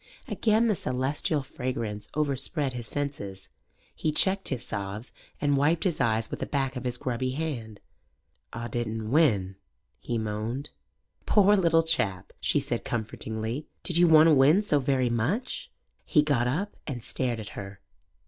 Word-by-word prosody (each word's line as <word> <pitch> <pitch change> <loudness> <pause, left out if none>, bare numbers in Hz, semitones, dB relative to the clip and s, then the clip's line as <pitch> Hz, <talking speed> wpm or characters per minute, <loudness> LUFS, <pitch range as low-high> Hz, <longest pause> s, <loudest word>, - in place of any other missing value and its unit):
Again 225 +1 +2
the 215 - +3
celestial 140 -1 -1
fragrance 115 -6 -4
overspread 145 -1 0
his 120 -2 -6
senses. 105 -10 -4 0.4
He 155 - -1
checked 190 +5 +1
his 125 -3 -3
sobs 100 +4 -5 0.3
and 145 -1 +2
wiped 150 +4 +2
his 175 -7 +1
eyes 110 -2 +1
with - - -4
the - - -3
back 135 -2 -1
of 125 - -5
his 125 0 -1
grubby 130 +1 -2
hand. 125 -9 -4 0.7
"Aw 115 +1 -5
didn't 110 -1 -3
win," 105 - +3 0.4
he 120 - -2
moaned. 110 +5 -3 0.6
"Poor 205 0 +6
little 165 -4 +4
chap," 100 - 0
she - - +2
said - - -2
comfortingly. 110 +3 -3 0.2
"Did 175 - -1
you 175 0 +6
want 160 -1 +8
to 165 - +6
win 150 +9 +5
so 150 -8 +2
very 130 -3 +1
much?" 150 - -1 0.3
He 150 - +3
got 130 -5 +2
up 180 +11 -2
and 125 -6 -4
stared 120 -3 -2
at 105 - -7
her. 100 0 -8
130 Hz, 160 wpm, -28 LUFS, 115-155 Hz, 0.7 s, want